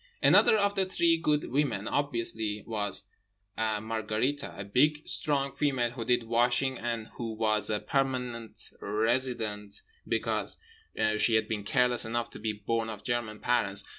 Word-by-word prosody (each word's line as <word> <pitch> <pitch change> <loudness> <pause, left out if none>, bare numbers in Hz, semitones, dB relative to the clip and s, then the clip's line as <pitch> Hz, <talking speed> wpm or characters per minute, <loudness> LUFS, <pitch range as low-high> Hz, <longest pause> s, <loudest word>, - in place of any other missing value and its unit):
Another 220 - +6
of 200 -1 +2
the 195 -2 0
three 170 -3 +3
Good 150 -2 0
Women 125 -7 0
obviously 115 -6 -1
was 105 -3 -2 0.5
Margherite—a 110 +2 -2
big, 150 +9 +2
strong 140 -2 +1
female 130 -6 0
who 120 -1 -5
did 120 0 +2
washing, 120 +3 +1
and 115 -2 -3
who 115 -2 -3
was 110 -2 +1
a 105 -1 0
permanent 125 -4 -2
resident 110 -1 -1 0.2
because - - -1 0.6
she 115 - +3
had 110 -1 +2
been 110 -2 -3
careless 125 +2 +2
enough 120 +1 -2
to - - -9
be 110 0 -1
born 110 +2 -2
of 105 -2 -7
German 120 -3 -2
parents. 110 -5 +3
115 Hz, 140 wpm, -29 LUFS, 110-130 Hz, 0.6 s, Another